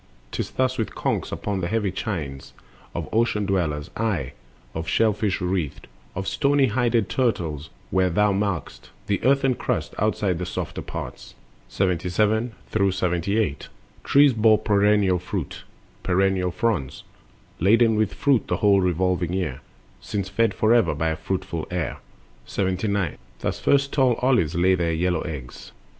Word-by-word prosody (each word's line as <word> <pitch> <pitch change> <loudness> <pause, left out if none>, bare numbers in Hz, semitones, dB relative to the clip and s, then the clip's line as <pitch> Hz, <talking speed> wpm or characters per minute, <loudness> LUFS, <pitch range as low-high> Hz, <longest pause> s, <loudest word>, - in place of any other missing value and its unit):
'Tis - - -3
thus 130 -1 0
with 110 - -2
conchs - - -1
upon 100 -2 -3
the 85 - -1
heavy 105 -1 0
chines 80 - -5 0.4
Of - - -3
ocean 110 -2 +1
dwellers, 80 -7 -1
aye, 105 - -1 0.4
of 80 +1 -4
shell 110 +5 +3
fish 105 -1 -1
wreathed, 90 -5 -2 0.3
Or 95 - -3
stony 140 +4 +2
hided 120 -2 +1
turtles, 85 - -1 0.2
where 95 -1 +3
thou 105 +3 +3
mark'st 100 -5 -3 0.2
The 100 -2 -1
earthen 135 +1 +3
crust - - -2
outside 100 -4 0
the 90 - -2
softer - - -4
parts. - - -8 0.3
77 105 +5 +1 0.2
78. 95 -3 0 0.4
Trees 140 -1 +5
bore 110 -1 +5
perennial 105 -3 +3
fruit, 90 -3 -5 0.4
perennial 95 0 +1
fronds, 90 - -2 0.6
Laden 110 +5 +4
with 105 -2 0
fruit 140 -5 +2
the - - 0
whole 100 -3 +4
revolving 90 0 0
year, 75 -8 -2 0.4
Since 95 - -4
fed 110 +1 +1
forever 110 -7 +3
by 80 +2 0
a 80 - -1
fruitful 95 -1 -4
air. 90 -2 -2 0.5
79. 95 -2 -1 0.2
Thus - - -2
first 140 0 +2
tall 130 -4 +3
olives 120 - +1
lay 90 +2 +4
their 85 -2 +1
yellow 90 0 0
eggs. 70 -7 -8
95 Hz, 140 wpm, -24 LUFS, 90-110 Hz, 0.6 s, Trees